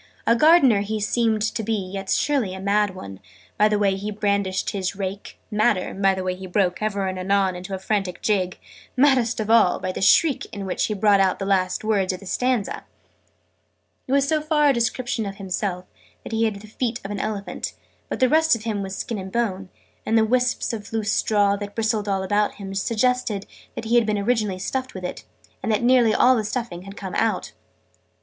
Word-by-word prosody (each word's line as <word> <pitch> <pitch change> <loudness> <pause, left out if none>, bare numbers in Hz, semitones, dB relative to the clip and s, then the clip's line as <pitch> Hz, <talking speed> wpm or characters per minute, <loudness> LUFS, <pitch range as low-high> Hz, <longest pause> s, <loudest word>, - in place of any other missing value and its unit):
A 230 - +4
Gardener 275 -7 +5
he 215 +2 -3
seemed 220 0 +1
to 220 +1 -1
be 225 +1 -1
yet 195 -1 -5
surely 255 -11 +1
a - - -7
mad 200 0 +1
one, 95 - -9 0.4
by 210 - +4
the 210 -1 +1
way 200 -2 +2
he 200 +2 -4
brandished 200 -2 -1
his 195 -1 -3
rake 195 0 -5
madder, 210 -3 +1
by 195 0 +2
the 190 - -4
way 185 0 -1
he 185 +1 -8
broke, 180 0 0
ever 200 -2 -1
and 185 -1 -3
anon, 190 0 +1
into 185 +2 -5
a - - -4
frantic 195 -1 -2
jig 185 -4 0 0.4
maddest 250 -4 +3
of 220 0 -1
all, 225 -6 +5
by 185 - -3
the - - -6
shriek 275 +9 +4
in 200 -3 -6
which 185 - -1
he 215 - -2
brought 205 0 +4
out 190 -1 +2
the 195 - -4
last 185 -1 0
words 205 -4 +1
of 185 - -6
the 195 - -13
stanza! 250 +1 0
{Image....The - - -2
gardener} - - -10 1.2
It - - -5
was 280 0 +3
so 310 0 +1
far 300 -1 +3
a - - +4
description 235 -2 -1
of 195 - -6
himself 185 -1 -3 0.4
that - - -8
he 225 0 +1
had 205 -3 -2
the 215 - -12
feet 230 +1 -3
of 200 - -5
an 205 - -3
Elephant: 210 -2 -4 0.4
but - - -3
the 255 - +5
rest 320 +1 +4
of 220 - -8
him 215 -3 -2
was 195 0 -5
skin 225 -3 -4
and 190 0 -7
bone: 195 -5 -2 0.3
and 225 - +1
the 220 - +4
wisps 250 +1 0
of 210 -2 -7
loose 220 -1 -1
straw, 205 -2 +2
that 205 0 -7
bristled 220 -2 0
all 195 -1 0
about 205 +2 +1
him, 195 -1 -7
suggested 230 +1 0 0.3
that - - -5
he 225 - -2
had 235 -2 +3
been 210 -1 +1
originally 210 -2 0
stuffed 260 +7 -4
with 185 - -7
it, 110 -11 -6 0.4
and 220 - -1
that 215 +1 +1
nearly 245 -2 +5
all 255 +4 +5
the 220 - 0
stuffing 215 -4 -4
had 195 +1 -10
come 190 -2 -6
out. 220 -4 0
210 Hz, 220 wpm, -23 LUFS, 195-230 Hz, 1.2 s, Gardener